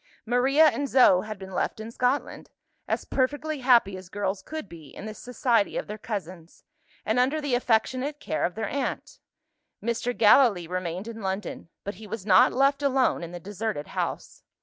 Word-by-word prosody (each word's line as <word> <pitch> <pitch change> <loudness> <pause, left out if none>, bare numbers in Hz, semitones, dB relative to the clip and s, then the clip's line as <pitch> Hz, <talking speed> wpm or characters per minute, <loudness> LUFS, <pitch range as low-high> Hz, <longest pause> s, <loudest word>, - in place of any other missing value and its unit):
Maria 260 +6 +4
and 285 -2 +1
Zo 220 -9 +6
had 215 0 -7
been 190 0 -10
left 180 - -2
in 220 +1 -7
Scotland 250 +4 -1 0.4
as - - -2
perfectly 290 +3 -1
happy 240 -7 +4
as 185 -1 -11
girls 195 -1 -2
could 315 +3 -7
be, 165 -4 -12
in - - -10
the 215 - -5
society 240 -2 0
of - - -3
their 210 +1 -7
cousins, 185 -6 -7 0.4
and 220 +4 +1
under 270 +5 +2
the 290 -4 -2
affectionate 255 +4 0
care 155 - -2
of 175 - -1
their 220 -1 -2
aunt. 280 +5 -4 0.6
Mr. 235 +2 -2
Gallilee 215 -5 +5
remained 180 +3 -4
in 225 -1 -7
London; 190 -3 -4
but 200 - -4
he 215 - -9
was 205 -2 -6
not 185 -3 +6
left 275 +2 +2
alone 270 -2 +2
in 170 - -7
the 175 - -7
deserted 205 -3 -4
house. - - -4
220 Hz, 180 wpm, -26 LUFS, 190-260 Hz, 0.6 s, Zo